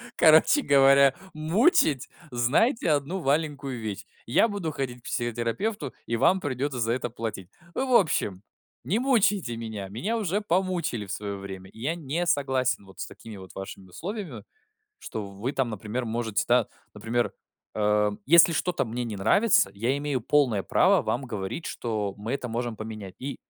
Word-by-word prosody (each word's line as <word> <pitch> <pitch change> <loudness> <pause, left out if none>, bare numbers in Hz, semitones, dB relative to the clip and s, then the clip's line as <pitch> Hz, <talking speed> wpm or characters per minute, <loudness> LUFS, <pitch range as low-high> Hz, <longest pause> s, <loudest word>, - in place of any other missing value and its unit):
короче 160 - +6
говоря, 140 - +5 0.2
мучить, 155 - +3 0.2
знайте 155 - +2
1 150 +6 0
маленькую 140 -3 -1
вещь: 105 -3 -5 0.2
я 125 - +4
буду 200 -7 -3
ходить 125 -4 -4
к - - -28
психотерапевту, 120 - -2
и 115 - -1
вам 185 +11 +4
придётся 140 -3 -2
за 115 -1 +1
это 120 0 -2
платить. 110 -5 -6 0.2
В - - -3 0.2
общем, 105 - +2 0.4
не 210 - 0
мучайте 210 - +2
меня. 110 -4 -5
Меня 190 - -2
уже 205 -1 -1
помучили 175 - -1
в - - -6
своё 100 0 -4
время. 95 -1 -8
И - - -16
я 145 +8 -1
не 165 +2 -2
согласен 130 -8 +1
вот 95 -2 -16
с - - -4
такими 110 -2 -11
вот 95 -1 -12
вашими 95 0 -8
условиями, 170 - -6 0.6
что 110 - -6
в 100 0 -12
вы 125 +6 -1
там, 135 -4 0
например, 110 +4 -4
можете, 110 -2 -1
да, 120 -2 +4 0.3
например, 120 +1 -1 0.4
эм, 105 -1 +2
если 170 +3 +7
что-то 175 +2 0
мне 120 +1 -3
не 115 -3 -5
нравится, 175 - +4
я 120 +7 0
имею 145 -3 -1
полное 120 -5 +2
право - - +4
вам 125 - -1
говорить, 110 - -5
что 105 -4 -3
мы 110 +4 -4
это 135 -2 -3
можем 120 0 -3
поменять. 110 -4 -7
И 135 +1 -4
125 Hz, 165 wpm, -26 LUFS, 110-160 Hz, 0.6 s, если